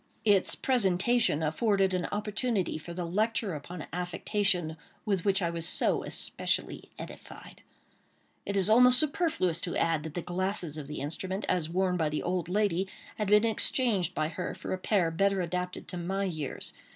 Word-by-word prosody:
Its 200 Hz, -3 st, +3 dB
presentation 220 Hz, -, +2 dB
afforded 195 Hz, +4 st, +1 dB
an 180 Hz, -2 st, -1 dB
opportunity 210 Hz, -1 st, -1 dB
for 170 Hz, -, -9 dB
the 175 Hz, 0 st, -4 dB
lecture 215 Hz, +3 st, -1 dB
upon 155 Hz, +2 st, -7 dB
affectation 180 Hz, -1 st, +1 dB, 0.3 s
with 195 Hz, -5 st, 0 dB
which 195 Hz, -1 st, +3 dB
I 170 Hz, -, 0 dB
was 165 Hz, 0 st, -2 dB
so -, -, +2 dB
especially -, -, -1 dB
edified. -, -, -11 dB, 0.8 s
It 200 Hz, -, -2 dB
is 190 Hz, -1 st, +3 dB
almost 250 Hz, +3 st, +7 dB
superfluous 290 Hz, -, +1 dB
to 175 Hz, -, -3 dB
add 165 Hz, -2 st, +1 dB
that 155 Hz, 0 st, -8 dB
the 175 Hz, -, -3 dB
glasses 180 Hz, -3 st, -2 dB
of 140 Hz, -, -8 dB
the 150 Hz, -, -6 dB
instrument, 185 Hz, +7 st, -3 dB
as 165 Hz, -3 st, 0 dB
worn 180 Hz, +1 st, 0 dB
by 160 Hz, -3 st, +1 dB
the 150 Hz, -, -3 dB
old 180 Hz, -1 st, -2 dB
lady, 195 Hz, -1 st, +1 dB, 0.3 s
had 210 Hz, -, -1 dB
been 210 Hz, +2 st, +5 dB
exchanged 225 Hz, -3 st, +2 dB
by 155 Hz, 0 st, 0 dB
her 180 Hz, +1 st, -5 dB
for -, -, -5 dB
a 185 Hz, -, -3 dB
pair 185 Hz, -4 st, +1 dB
better 195 Hz, +3 st, +1 dB
adapted 180 Hz, +1 st, -3 dB
to 180 Hz, -, -5 dB
my 190 Hz, +3 st, -2 dB
years. 155 Hz, -7 st, -4 dB
185 Hz, 170 wpm, -29 LUFS, 170-205 Hz, 0.8 s, almost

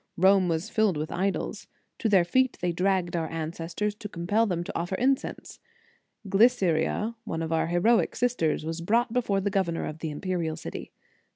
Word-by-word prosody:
Rome 190 Hz, 0 st, +5 dB
was 165 Hz, +6 st, -2 dB
filled 215 Hz, -7 st, +2 dB
with 155 Hz, +1 st, -3 dB
idols. 190 Hz, +2 st, -2 dB, 0.3 s
To 225 Hz, -, +1 dB
their 190 Hz, -4 st, +5 dB
feet 260 Hz, +7 st, +2 dB
they 180 Hz, -1 st, 0 dB
dragged 180 Hz, 0 st, 0 dB
our 165 Hz, -2 st, -1 dB
ancestors, 165 Hz, +5 st, -3 dB
to 210 Hz, 0 st, -8 dB
compel 205 Hz, +6 st, +1 dB
them 175 Hz, -3 st, -1 dB
to -, -, -7 dB
offer 175 Hz, +3 st, -2 dB
in 265 Hz, +6 st, +3 dB
cense. -, -, -9 dB, 0.7 s
Glyceria, 200 Hz, -1 st, +2 dB
one 165 Hz, -7 st, -3 dB
of 160 Hz, 0 st, -2 dB
our 160 Hz, -, +1 dB
heroic 180 Hz, +8 st, +2 dB
sisters, 230 Hz, -11 st, 0 dB
was 165 Hz, +1 st, -4 dB
brought 230 Hz, +6 st, +1 dB
before 210 Hz, -6 st, +1 dB
the 205 Hz, +1 st, -1 dB
governor 185 Hz, -4 st, 0 dB
of 155 Hz, -, -6 dB
the 160 Hz, -, -3 dB
imperial 165 Hz, +1 st, -2 dB
city. -, -, -7 dB
185 Hz, 180 wpm, -27 LUFS, 165-210 Hz, 0.7 s, Rome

